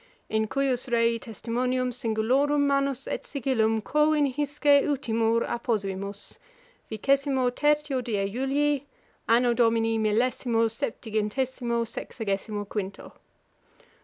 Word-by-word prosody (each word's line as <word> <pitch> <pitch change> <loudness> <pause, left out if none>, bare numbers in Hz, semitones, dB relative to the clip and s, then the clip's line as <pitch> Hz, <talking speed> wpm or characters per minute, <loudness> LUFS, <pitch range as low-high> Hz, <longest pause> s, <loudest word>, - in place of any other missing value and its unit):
In 220 0 0
cujus 265 0 -1
rei 230 0 +2
testimonium 250 +3 -2
singulorum 250 +5 +1
manus 275 -1 +1
et - - -3
sigillum 225 -5 0
quo 300 +4 +2
in 300 -1 +3
hisce 290 0 +3
utimur 230 -5 +1
apposuimus; 200 -4 -3 0.5
vicesimo 265 +2 +1
tertio 295 -1 +1
die 205 -4 -1
Julii, 270 +5 0 0.5
Anno 240 +1 +4
Domini 225 -1 +2
millesimo 230 +1 +1
septingentesimo 235 +2 -2
sexagesimo 205 -2 -4
quinto. 200 -2 -5
240 Hz, 100 wpm, -26 LUFS, 220-275 Hz, 0.5 s, Anno